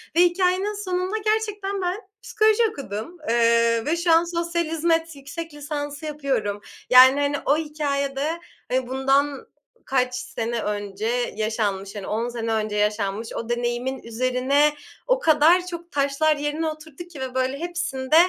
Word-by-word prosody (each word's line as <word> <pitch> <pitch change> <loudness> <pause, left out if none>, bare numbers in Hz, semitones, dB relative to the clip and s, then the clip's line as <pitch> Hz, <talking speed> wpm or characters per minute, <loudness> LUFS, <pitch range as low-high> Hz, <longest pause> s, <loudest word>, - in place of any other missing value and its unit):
ve - - +3
hikâyenin 370 +3 +2
sonunda 370 +3 -1
gerçekten 420 -2 -1
ben 360 +1 -1 0.3
psikoloji 435 -1 +3
okudum, 270 - -6
eee, 230 0 +3
ve 325 +3 +1
şu 340 0 +1
an 330 +1 +6
sosyal 340 0 -1
hizmet 325 0 0
yüksek 295 +4 -7
lisansı 290 0 -5
yapıyorum. 275 -9 -2 0.3
Yani, 260 +2 +8
hani, 285 0 +1
o 285 - +3
hikâyede, 295 0 -2 0.3
eee, 255 0 0
bundan 270 +2 +1 0.4
kaç 255 -1 +1
sene 235 -2 -3
önce 205 0 -3 0.3
yaşanmış, 210 -3 -2
hani, 200 -2 -6
10 230 +3 -1
sene 230 -1 -2
önce 215 -1 -1
yaşanmış 210 +1 0
o 230 - -5
deneyimin 240 +2 -2
üzerine 255 +5 +2 0.3
o - - +3
kadar 325 0 +4
çok 345 -1 -8
taşlar 285 +2 +2
yerine 295 +2 -2
oturdu 310 0 -7
ki 345 -6 -11
ve, 260 -1 -5
böyle, 260 +1 0
hepsinde 340 -6 -2
285 Hz, 145 wpm, -24 LUFS, 240-335 Hz, 0.4 s, Yani